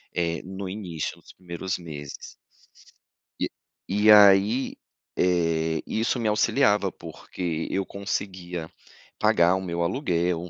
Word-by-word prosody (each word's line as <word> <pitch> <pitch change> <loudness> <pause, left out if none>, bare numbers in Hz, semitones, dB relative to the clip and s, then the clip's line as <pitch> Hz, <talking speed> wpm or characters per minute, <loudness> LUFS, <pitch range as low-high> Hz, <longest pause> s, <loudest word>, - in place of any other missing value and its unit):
eh, 85 -1 -1
no 95 +1 -6
início 90 -5 -5
dos - - -15
primeiros 90 +2 -5
meses. 75 -4 -9 1.1
E - - 0 0.4
e 105 +3 +5
aí, 105 +4 +6 0.4
eh, 80 -3 +1
isso 115 +3 0
me 115 - -1
auxiliava, 105 -2 +2
porque 85 0 -5
eu 95 0 -1
conseguia 90 -4 -4 0.5
pagar 85 +2 +4
o 95 - -2
meu 85 -2 -3
aluguel, 90 - -1
90 Hz, 115 wpm, -25 LUFS, 85-100 Hz, 1.1 s, aí